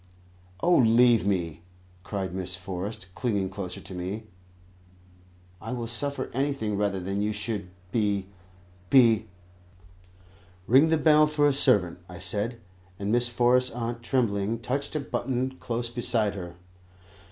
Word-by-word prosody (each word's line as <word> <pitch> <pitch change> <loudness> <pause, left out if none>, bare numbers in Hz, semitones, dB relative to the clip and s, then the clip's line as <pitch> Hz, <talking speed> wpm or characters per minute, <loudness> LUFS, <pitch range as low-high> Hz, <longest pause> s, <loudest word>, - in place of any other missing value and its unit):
"Oh, 175 0 +4
leave 115 -2 +5
me," 85 -5 -1 0.4
cried 95 -2 -4
Miss 90 -1 -2
Forrest, 95 +1 -6
clinging 100 -6 -1
closer 95 -2 -6
to - - -10
me; 95 +5 -4 1.4
"I 115 +3 -5
will 120 -2 -3
suffer 140 +5 -2
anything 135 -5 -1
rather 100 -1 0
than 95 +2 -3
you 105 +1 0
should 105 -2 -4 0.2
be 105 -4 0 0.6
be 115 -5 +5 0.7
" 90 0 -28
"Ring 135 +9 +5
the 160 - +3
bell 155 -1 +5
for 150 -1 +2
a 145 - +3
servant," 90 -10 +3
I 90 - -9
said; 115 +6 0 0.4
and 100 +1 -2
Miss 120 +1 +3
Forrest's 125 +1 +3
aunt 115 0 -4
tremblingly 115 -3 0
touched 130 +6 -3
a - - +1
button 130 -2 -2
close 120 0 -2
beside 115 -3 +1
her. 90 -3 -7
110 Hz, 140 wpm, -27 LUFS, 95-125 Hz, 1.4 s, leave